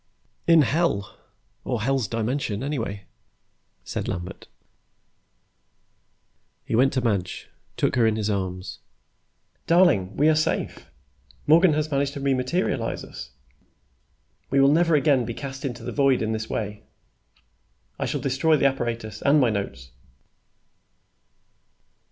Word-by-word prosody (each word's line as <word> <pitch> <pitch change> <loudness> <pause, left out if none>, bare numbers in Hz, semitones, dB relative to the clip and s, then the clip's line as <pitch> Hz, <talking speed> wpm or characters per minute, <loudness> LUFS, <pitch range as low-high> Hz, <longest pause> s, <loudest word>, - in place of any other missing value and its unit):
"In 165 -2 +7
Hell 135 - 0 0.5
or 120 -4 -2
Hell's 135 -2 +1
Dimension, 115 0 -2
anyway," 115 -9 -4 0.8
said - - -4
Lambert. 90 +3 -6 2.2
He - - -5
went 130 +4 +4
to 130 - 0
Madge, 100 -7 -2 0.3
took - - +1
her 115 -2 +4
in 110 - +1
his 110 -2 -2
arms. 95 -3 -3 0.9
"Darling, 165 - +3
we 150 - +4
are 160 - +5
safe. 155 0 -1 0.6
Morgan 165 +2 +5
has 155 +1 -1
managed 140 0 0
to - - -6
re 135 0 +1
materialize 130 +8 -1
us. - - -9 1.2
We 135 - +2
will 135 +1 +6
never 165 +1 +3
again 140 -3 +3
be 115 0 -5
cast 135 0 -6
into 120 -3 -5
the - - -4
void 135 -4 +2
in 110 - -1
this 110 0 -3
way. 105 -1 -4 1.2
I - - -1
shall - - -2
destroy 145 +3 +2
the 140 - +1
apparatus 115 -5 -2
and 145 +2 +4
my 125 -4 +3
notes." 65 -12 -5
130 Hz, 130 wpm, -24 LUFS, 110-145 Hz, 2.2 s, In